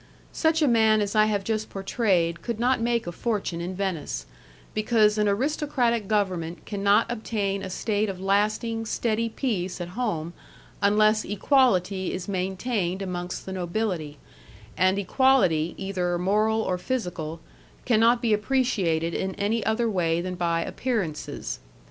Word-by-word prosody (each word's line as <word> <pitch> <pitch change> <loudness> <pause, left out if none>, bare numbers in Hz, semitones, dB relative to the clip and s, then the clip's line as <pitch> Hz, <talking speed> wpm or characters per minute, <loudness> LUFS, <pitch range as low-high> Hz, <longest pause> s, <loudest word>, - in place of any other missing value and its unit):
Such 320 -1 +2
a - - +4
man 220 -3 +4
as 205 0 -1
I 215 0 +6
have 205 -2 0
just 215 +1 -2
portrayed 190 -4 0
could 235 -2 -4
not 245 0 +2
make 235 0 +1
a 175 - -4
fortune 195 -4 -2
in 180 +2 -4
Venice, 165 - -3 0.5
because 215 -1 +3
an 210 - +3
aristocratic 240 -1 0
government 185 -5 -1
can 205 -2 -5
not 200 +3 +4
obtain 215 -4 -2
a 190 - -5
state 210 +2 -1
of 190 -2 -5
lasting, 215 +4 0
steady 230 0 0
peace 200 -8 -2
at 175 0 -5
home 175 -6 -3 0.5
unless 215 +1 +4
equality 200 -4 +2
is 185 +1 -6
maintained 190 0 -2
amongst 180 -1 -4
the 190 - -5
nobility, 175 -4 -2 0.6
and 185 +2 +3
equality, 195 - +3
either 180 -2 -1
moral 215 +4 +2
or 180 -3 -1
physical, 175 -10 -3 0.5
cannot 235 +1 +4
be 225 -2 +3
appreciated 205 -9 +1
in 190 0 -2
any 210 +2 0
other 225 +2 +1
way 170 -6 +1
than 180 +1 -3
by 170 -2 0
appearances. 160 - -3
200 Hz, 145 wpm, -26 LUFS, 180-225 Hz, 0.6 s, I